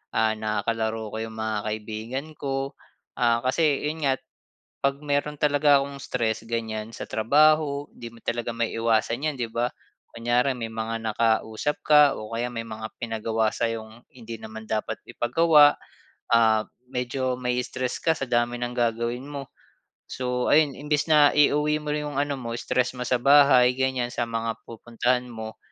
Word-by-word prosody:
ah 110 0 +3
nakalaro 110 0 -2
ko - - -5
'yong 110 0 -5
mga 110 -1 -2
kaibigan 110 +6 -4
ko, 135 0 -2 0.5
ah 120 -1 +2
kasi 145 +2 +2
'yon 155 +1 -3
nga, 135 - +4 0.7
'pag 140 0 0
mayro'n 145 0 -1
talaga 145 -1 +4
akong 140 0 -7
stress 115 -4 -2
ganyan 115 -1 -4
sa - - -7
trabaho 145 +4 +3
'di 120 -1 -10
mo 115 - -17
talaga 120 0 -2
maiiwasan 115 +3 0
'yan 155 - 0
'di 120 -3 -3
ba, 120 +2 0 0.5
kunyari 120 +3 +1
may 115 -2 -5
mga 115 0 -4
nakausap 110 +5 0
ka 150 -2 +6
o 110 0 -8
kaya 120 +1 -1
may 120 -2 -4
mga 110 0 -6 0.2
pinagawa 110 -1 0
sa'yong 115 0 -4
hindi 115 -2 -8
naman 110 0 -9
dapat 110 -1 -2
ipagawa, 150 +3 +5 0.6
ah, 110 -2 +4 0.3
medyo 125 0 -2
mai-stress 125 0 -2
ka 160 - +4
sa 135 - -4
dami 120 0 0
ng 120 0 -3
gagawin 120 +1 -1
mo. 140 -2 -6 0.6
So, 125 -1 -2
ayun 150 -1 +5
imbis 150 +1 -1
na 150 -2 +6
iuwi 150 +1 +3
mo 150 - -8
yung 150 -1 -3
ano 145 -1 -1
mo 115 -1 -5
stress 125 +1 0
mo - - -7
sa 125 - +2
bahay 140 -2 +6
ganyan 130 -2 0
sa 120 - -1
mga 115 0 -3
pupuntahan 120 +2 -1
mo, 110 -2 -7
120 Hz, 160 wpm, -25 LUFS, 115-140 Hz, 0.7 s, ka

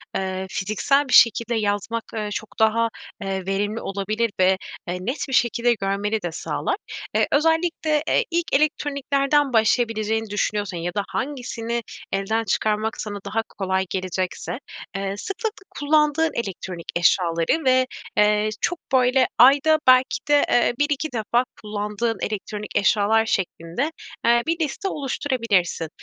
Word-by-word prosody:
eee, 190 0 -2
fiziksel 215 +10 +1
bir 255 - -3
şekilde 235 +1 +5
yazmak, 215 +2 -1
eee, 215 -2 -3
çok 215 0 -6
daha, 225 +1 +3 0.3
eee, 195 -1 -3
verimli 205 +3 -1
olabilir 210 +3 -1
ve, 185 +1 +4 0.3
eee, 175 - -2
net 250 +10 -3
bir - - -4
şekilde 240 0 +3
görmeni 205 +1 -1
de 175 -2 -3
sağlar. 380 - -2 0.4
Eee, - - +3
özellikle, 320 0 +2
eee, - - +3
ilk 340 -4 0
elektroniklerden 280 -1 +1
başlayabileceğini 220 -1 +1
düşünüyorsan 205 -2 -1
ya 175 +1 -3
da 205 - -1
hangisini 235 -4 -3 0.3
elden 205 +4 0
çıkarmak 215 +1 -1
sana 205 -1 -5
daha 225 - -1 0.2
kolay 190 -1 0
gelecekse, 185 +4 -3 0.4
eee, 195 0 -2
sıklıkla 415 - -4 0.2
kullandığın 300 +1 +3
elektronik 185 -5 -5
eşyaları 170 - +2
ve, 255 0 +4 0.3
eee, 210 0 +3
çok, 350 -1 -1
böyle, 255 0 +4
ayda 285 +5 +6
belki 255 0 +5
de, 290 0 +5
eee, 240 0 +3
1-2 290 +1 0
defa 235 +2 +1 0.2
kullandığın 210 +1 -2
elektronik 210 0 -5
eşyalar 210 +2 +3
şeklinde, 190 - -2 0.3
eee, 235 0 +4
bir 330 +1 0
liste 320 +6 -2
oluşturabilirsin. 230 - -1
225 Hz, 135 wpm, -23 LUFS, 200-275 Hz, 0.4 s, ayda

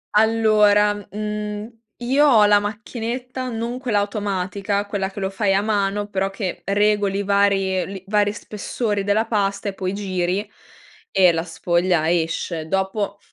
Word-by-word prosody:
Allora, 210 -1 +4 0.2
mhmm, 210 +1 -4 0.3
io 270 +5 +3
ho 225 -7 +6
la 205 0 +5
macchinetta 235 +4 -5
non 235 +1 -3
quella 240 -5 0
automatica, 200 0 -2
quella 200 -2 -2
che 195 +1 -8
lo 190 - -1
fai 195 0 0
a 195 - +3
mano, 205 -1 0
però 195 -1 -1
che 190 -3 -5
regoli 205 0 +2
i - - -1
vari 195 -2 +2
li 195 -1 -8
vari 205 0 +2
spessori 210 0 -3
della 210 +2 +2
pasta 200 -2 -1
e - - -6
poi 190 -1 -3
giri 195 0 -2 0.6
e 185 -3 +5
la 165 -1 -1
sfoglia 170 0 +1
esce. 165 -1 -1
Dopo, 195 +2 -1
205 Hz, 150 wpm, -21 LUFS, 195-210 Hz, 0.6 s, ho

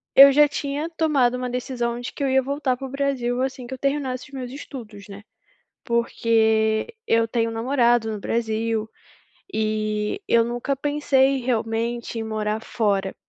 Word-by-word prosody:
eu 275 +1 +10
já 295 +2 +6
tinha 290 +2 -3
tomado 300 -7 +2
uma 250 0 -3
decisão 240 -1 -2
de 245 - -6
que 285 - -5
eu 275 - +1
ia 265 0 +4
voltar 275 0 -1
para 270 +2 -7
o - - -10
Brasil 260 -3 -1
assim 260 -2 -3
que 260 - -6
eu - - -5
terminasse 270 -2 -2
os - - -23
meus 255 -2 -6
estudos, 225 -8 -9
né, 200 0 -10 0.6
porque 225 - +1
eu 230 0 +3
tenho 230 0 0
namorado 235 -1 +2
no 210 - -5
Brasil, 225 0 -1 0.6
e 215 - -1
eu 230 0 +4
nunca 240 +4 -2
pensei 275 -1 +2
realmente 235 -1 -2
em - - -2
morar 215 0 -2
fora, 200 -5 -1
240 Hz, 165 wpm, -23 LUFS, 225-270 Hz, 0.6 s, eu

